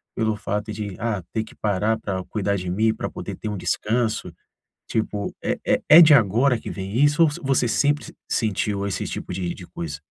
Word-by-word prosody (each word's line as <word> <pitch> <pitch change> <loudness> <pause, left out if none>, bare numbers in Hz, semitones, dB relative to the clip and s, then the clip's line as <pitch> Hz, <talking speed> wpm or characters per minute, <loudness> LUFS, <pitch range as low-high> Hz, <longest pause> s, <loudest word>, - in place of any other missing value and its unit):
pelo 110 -1 0
fato 105 +1 -3
de 100 -3 -5
"Ah, 105 -4 -1
ter 110 -1 0
que 110 - -14
parar 105 +2 0
pra 95 -2 -3
cuidar 100 -2 0
de 90 -2 -4
mim 110 +4 +2
pra - - -4
poder - - -6
ter 110 - -5
um 105 - -3
descanso?". 110 -1 -1 0.6
Tipo 105 -2 -2
é - - -1
é - - +2
é 165 +3 +11
de 155 -2 +8
agora 120 +2 +4
que - - -7
vem 95 +3 -4
isso 150 +3 +4
ou 160 - +5
so - - -7
você 135 -3 +2
sempre 145 +4 +1
s - - -11 0.2
sentiu 105 -2 0
esse 95 - -3
tipo - - -5
de 90 -2 -3
de 90 - -11
coisa? 80 -3 -6
105 Hz, 215 wpm, -23 LUFS, 95-115 Hz, 0.6 s, é